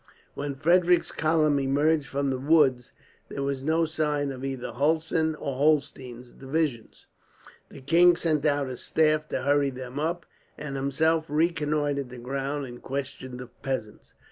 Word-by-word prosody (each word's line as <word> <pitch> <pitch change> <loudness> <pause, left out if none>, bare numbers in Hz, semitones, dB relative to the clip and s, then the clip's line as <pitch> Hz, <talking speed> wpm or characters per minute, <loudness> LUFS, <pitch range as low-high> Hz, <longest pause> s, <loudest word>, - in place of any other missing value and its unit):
When 140 -1 -4
Frederick's 175 +4 +3
column 155 -2 +2
emerged 145 +2 +1
from 140 0 -1
the 130 - -2
woods, 135 -4 +3 0.4
there 140 - -4
was 140 -1 -2
no 160 +3 +2
sign 150 -2 -1
of 130 -1 -8
either 135 -3 -4
Hulsen 160 +4 +1
or 140 -3 -5
Holstein's 135 -4 0
divisions. 135 -4 -3 0.6
The - - -12
king 170 +5 +5
sent 155 -4 0
out 145 -2 +1
his 125 -2 -6
staff 155 -1 +1
to 130 - -2
hurry 140 0 +2
them 130 +1 -7
up, 170 +2 -2 0.3
and 145 -2 -6
himself 155 +4 +1
reconnoitred 150 -3 0
the 125 - -10
ground 135 +3 -3
and 120 -1 -10
questioned 130 -2 -5
the 125 - -6
peasants. 125 -3 -6
145 Hz, 150 wpm, -26 LUFS, 135-155 Hz, 0.6 s, king